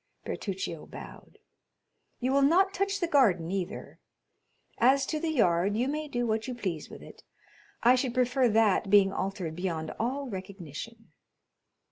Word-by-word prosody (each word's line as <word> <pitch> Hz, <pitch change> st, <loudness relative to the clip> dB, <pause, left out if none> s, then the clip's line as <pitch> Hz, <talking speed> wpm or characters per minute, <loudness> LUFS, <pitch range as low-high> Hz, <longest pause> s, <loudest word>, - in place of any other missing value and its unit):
Bertuccio 190 Hz, -5 st, -4 dB
bowed. -, -, -11 dB, 0.8 s
"You 255 Hz, +1 st, 0 dB
will 280 Hz, +1 st, +3 dB
not 370 Hz, +7 st, +4 dB
touch 395 Hz, +1 st, -1 dB
the 345 Hz, -, 0 dB
garden 195 Hz, -, +3 dB
either; 190 Hz, -1 st, -5 dB, 0.8 s
as 270 Hz, +3 st, +4 dB
to 310 Hz, -, -2 dB
the 330 Hz, -, -2 dB
yard, 200 Hz, -, +2 dB
you 245 Hz, +3 st, +1 dB
may 305 Hz, +2 st, -3 dB
do 245 Hz, -4 st, -2 dB
what 220 Hz, 0 st, -1 dB
you 250 Hz, -, -4 dB
please 185 Hz, -10 st, -4 dB
with -, -, -11 dB
it; -, -, -13 dB, 0.6 s
I 240 Hz, +2 st, +7 dB
should 255 Hz, -1 st, 0 dB
prefer 250 Hz, 0 st, +2 dB
that 215 Hz, -2 st, +3 dB
being 195 Hz, -1 st, +5 dB
altered 190 Hz, -4 st, -3 dB
beyond 165 Hz, -3 st, -3 dB
all 270 Hz, +5 st, -2 dB
recognition." 195 Hz, -, -8 dB
230 Hz, 150 wpm, -29 LUFS, 190-270 Hz, 0.8 s, I